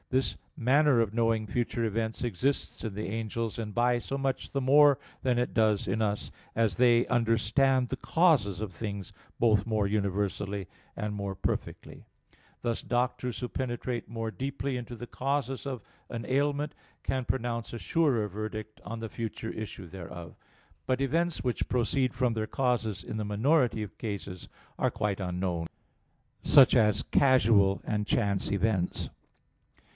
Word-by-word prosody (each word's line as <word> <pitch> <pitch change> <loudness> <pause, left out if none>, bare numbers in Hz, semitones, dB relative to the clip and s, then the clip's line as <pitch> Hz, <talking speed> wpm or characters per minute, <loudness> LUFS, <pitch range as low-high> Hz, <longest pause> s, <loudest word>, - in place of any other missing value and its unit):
This 130 +1 +1 0.2
manner 135 +1 +4
of 110 -3 +1
knowing 115 -1 +2
future 120 +1 -1
events 110 +1 -2
exists 125 +5 -1
in 110 -4 -4
the 105 - -3
angels, 115 +1 -3
and 105 -2 -4
by 120 +2 +3
so 135 +3 -4
much 135 -1 -2
the 140 - 0
more 140 +1 +6 0.2
than 125 -2 +1
it 125 - -1
does 110 -3 +2
in 110 - 0
us, 105 -1 -1 0.2
as 110 -5 +2
they 120 0 +5
understand 125 +3 +2
the 135 - -2
causes 135 - +3
of 105 -4 -4
things 100 0 -5 0.3
both 110 -4 +4
more 110 -2 +1
universally 100 -1 -1 0.3
and 105 0 -2
more 100 -1 -3
perfectly; - - -4 0.6
thus 115 -1 -1
doctors 125 0 -1
who 125 - -2
penetrate 120 -1 -3
more 115 -1 -3
deeply 135 +2 -3
into 120 -1 -5
the 120 - -7
causes 135 0 -2
of 130 -5 -4 0.3
an 115 -1 -5
ailment 145 +2 +1 0.3
can 130 -1 -1
pronounce 120 -2 -2
a 120 - -5
surer 135 -10 +2
verdict 110 +1 -6
on 115 +1 -5
the 115 - -4
future 115 0 -5
issue 110 -3 -6
thereof. 85 -1 -9 0.5
But 130 0 +1
events 165 +5 +1
which 125 -2 -1
proceed 125 +1 +1
from 125 -2 +1
their 110 -1 -2
causes 115 -6 0
in - - -6
the 110 - -1
minority 115 +3 +2
of 105 - -9
cases 100 -4 -5 0.3
are - - +2
quite 100 -2 -1
unknown; 90 -2 -2 0.7
such 135 -3 +7
as 105 -3 +4
casual 110 -7 +4
and 105 -1 -1
chance 100 -4 +1
events. 100 -2 0
115 Hz, 155 wpm, -29 LUFS, 105-130 Hz, 0.7 s, such